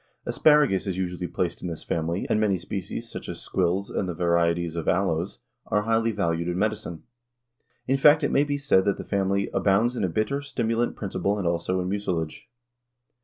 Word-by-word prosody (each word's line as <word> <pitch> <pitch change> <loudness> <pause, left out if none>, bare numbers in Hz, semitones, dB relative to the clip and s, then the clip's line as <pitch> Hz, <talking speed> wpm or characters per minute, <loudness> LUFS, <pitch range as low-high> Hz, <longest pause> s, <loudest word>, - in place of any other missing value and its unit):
Asparagus 150 - +3
is 95 -2 -2
usually 90 -1 -3
placed 85 0 -2
in - - -4
this 80 -2 -6
family 85 +3 -2
and 110 - +1
many 105 -3 +2
species, 90 +1 -5
such - - -7
as - - -5
squills 95 +2 -1
and 95 - -2
the 85 - -3
varieties 85 -1 +1
of 85 - -4
aloes, 90 -1 0 0.3
are 105 +1 +1
highly 115 +1 +2
valued 85 -5 -1
in 90 0 -1
medicine. 105 -5 -2 0.8
In 135 +1 +2
fact 150 +2 +6
it 145 - +1
may 140 - +4
be 145 -1 -1
said 140 -9 +3
that 100 - +1
the - - -6
family 100 0 0
"abounds 110 +5 +2
in 120 - -2
a 95 - +1
bitter, 110 +10 -1
stimulant 120 -4 -1
principle 100 0 -1
and 100 - -3
also 85 +2 0
in 90 - -3
mucilage." 90 -5 -3
95 Hz, 190 wpm, -25 LUFS, 85-110 Hz, 0.8 s, fact